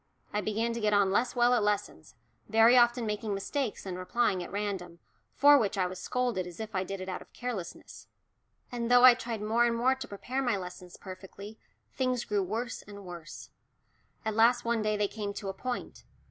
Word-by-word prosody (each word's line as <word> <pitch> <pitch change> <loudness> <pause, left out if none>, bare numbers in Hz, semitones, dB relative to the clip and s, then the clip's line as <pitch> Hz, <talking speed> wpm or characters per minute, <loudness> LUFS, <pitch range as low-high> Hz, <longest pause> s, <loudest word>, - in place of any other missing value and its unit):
I 210 - 0
began 220 +3 -1
to 235 - -4
get 210 -1 +2
on 200 -1 +3
less 240 +6 +1
well 245 0 +4
at 245 - +3
lessons, 210 0 -2 0.3
very 225 +2 +6
often 240 -1 +4
making 210 -1 -2
mistakes 235 +4 -3
and 185 -1 -5
replying 190 0 0
at 175 - -7
random, 195 -4 -4 0.4
for 285 +1 +7
which 205 -3 -1
I 185 - +2
was 180 0 -5
scolded 245 -8 -1
as 175 -2 -11
if 220 -1 -6
I 185 -1 0
did 195 0 -6
it 185 - -6
out 185 - -4
of - - -15
carelessness. 225 -9 -7 0.6
And 235 -1 -3
though 245 0 +7
I 255 - +10
tried 235 -3 -5
more 225 +3 +2
and 235 -1 +2
more 250 +3 +3
to 265 0 -7
prepare 250 +6 -4
my 245 -6 +1
lessons 180 -1 -9
perfectly, 195 +3 -10 0.3
things 255 -2 -1
grew 205 -1 0
worse 225 +5 -3
and 200 -1 -12
worse. 175 -2 -9 0.7
At 220 - 0
last 235 +2 +4
one 235 -1 +1
day 215 0 0
they 205 0 +1
came 205 -1 -5
to 200 - -5
a - - -3
point. 250 +5 -5
215 Hz, 205 wpm, -30 LUFS, 195-240 Hz, 0.7 s, I